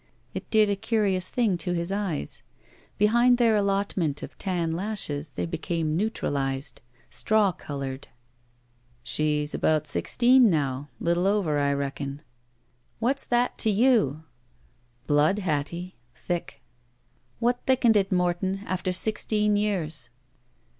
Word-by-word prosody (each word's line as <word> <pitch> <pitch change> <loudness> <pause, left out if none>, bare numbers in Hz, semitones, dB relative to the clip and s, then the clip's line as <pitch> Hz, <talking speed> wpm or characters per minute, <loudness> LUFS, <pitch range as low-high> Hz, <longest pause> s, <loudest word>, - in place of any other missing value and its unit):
It - - -6
did 215 -1 +4
a 200 - +1
curious 200 -3 0
thing 215 -8 +1
to 175 +1 -2
his 170 +1 -2
eyes. 195 - -3 0.6
Behind 240 +4 +4
their 230 -3 +4
allotment 195 -7 0
of - - -8
tan 175 -4 -1
lashes 165 -6 -2
they - - -2
became 165 -1 -2
neutralized. 140 - -2 0.3
Straw 215 -3 +2
colored. 140 -4 -6 1.0
"She's 150 +3 0
about 155 -1 +1
sixteen 245 +8 +4
now. 145 -4 -1
Little 170 +2 +1
over, 190 -8 +1
I 140 0 +2
reckon." 140 +1 -4 0.8
*'What'sthattoyou?" 235 - +2 0.8
*'Blood, 150 +6 +3
Hattie. 170 - -3 0.2
Thick." 175 +6 -5 0.7
"What 245 +1 0
thickened 250 -4 +4
it, 195 -1 +2
Morton 180 +2 0
— - - -13
after 185 0 -2
sixteen 210 +1 +1
years?" 165 - -1
185 Hz, 115 wpm, -26 LUFS, 150-210 Hz, 1.0 s, did